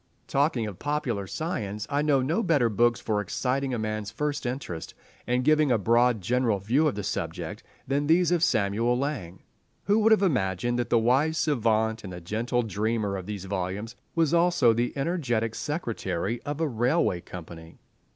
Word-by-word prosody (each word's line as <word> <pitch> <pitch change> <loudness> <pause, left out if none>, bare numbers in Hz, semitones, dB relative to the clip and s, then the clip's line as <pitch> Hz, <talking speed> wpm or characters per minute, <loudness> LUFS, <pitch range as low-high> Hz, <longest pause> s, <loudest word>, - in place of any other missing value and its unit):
Talking 135 -5 +1
of 105 -4 -7
popular 135 -9 -2
science, 105 - -3
I 145 0 0
know 145 -3 +2
no 160 - +1
better 150 - +2
books 120 +2 +2
for 105 -2 -1
exciting 130 +7 -1
a 125 - -1
man's 110 -1 -3
first 145 +4 -2
interest, 120 - -5 0.3
and 125 +1 +1
giving 155 0 +4
a 120 - +4
broad 115 +2 +3
general 120 +1 +1
view 120 +11 +2
of 140 - -1
the 105 - -4
subject, - - -4 0.3
than 140 +2 0
these 175 +2 +4
of 175 -2 +2
Samuel 115 0 +2
Laing. 125 - -4 0.4
Who 205 +2 +3
would 220 +1 +4
have 215 -2 +5
imagined 120 - 0
that 120 - -2
the 120 - +4
wise 135 +8 +2
savant 110 -6 +1
and 90 -3 -7
gentle 120 +5 0
dreamer 110 -1 -1
of 95 -1 -6
these 100 -3 -5
volumes 100 +4 -4 0.2
was 165 -2 +2
also 170 -9 +4
the 120 +2 0
energetic 130 -8 -1
secretary 115 - -3
of 145 +1 -5
a 165 - +1
railway 120 - +1
company? 85 -2 -10
120 Hz, 170 wpm, -27 LUFS, 105-145 Hz, 0.4 s, have